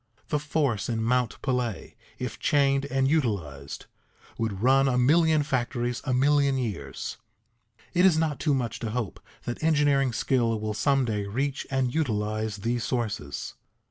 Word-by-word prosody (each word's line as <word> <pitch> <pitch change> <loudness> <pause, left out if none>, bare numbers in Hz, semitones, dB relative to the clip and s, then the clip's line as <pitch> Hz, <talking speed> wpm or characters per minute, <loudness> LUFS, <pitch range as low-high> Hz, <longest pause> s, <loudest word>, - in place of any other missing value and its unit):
The 150 - +1
force 140 - -1
in 110 -1 -1
Mount 125 0 +1
Pelée, 125 -5 -2 0.2
if - - -5
chained 140 -1 +2
and 135 -1 +1
utilized, 95 - -2 0.5
would 110 -3 -2
run 135 +2 +5
a 125 -2 +1
million 155 +4 +4
factories 120 -2 -1
a 130 - -1
million 140 +1 +3
years. 100 - -4 0.8
It 180 - +3
is 185 -4 +5
not 160 -3 0
too 150 -4 +2
much 120 -4 -2
to 115 - -3
hope 115 -2 -3 0.2
that 120 - -5
engineering 145 -4 +3
skill 115 -2 +1
will 110 0 -2
some 135 +4 +2
day 105 -3 -2
reach 135 +6 -2
and 130 -2 0
utilize 110 -6 -1
these 120 0 0
sources. 105 - -3
125 Hz, 150 wpm, -27 LUFS, 110-140 Hz, 0.8 s, run